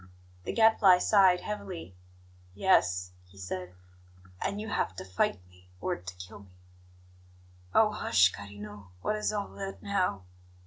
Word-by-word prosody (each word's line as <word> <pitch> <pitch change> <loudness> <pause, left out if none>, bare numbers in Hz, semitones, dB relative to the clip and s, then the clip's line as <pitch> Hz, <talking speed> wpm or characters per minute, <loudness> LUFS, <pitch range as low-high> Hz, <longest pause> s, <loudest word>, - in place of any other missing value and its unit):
The - - -2
Gadfly 220 -5 +6
sighed 185 -2 +4
heavily. 195 - -6 0.6
"Yes," 90 - +2 0.2
he 95 +2 -20
said; 90 -1 -6 0.7
"and 200 - -2
you 215 - -5
have 95 - -1
to 95 - -7
fight 95 +1 0
me, 90 0 -22
or - - -1
to 90 +1 -9
kill 90 +2 -10
me." 95 -2 -18 1.2
"Oh, 215 -1 +5
hush, 95 - +3
carino! 100 0 -10
What 215 - 0
is 215 - -1
all 205 -2 -3
that 195 0 -7
now? 185 - 0
100 Hz, 140 wpm, -29 LUFS, -, 1.2 s, Gadfly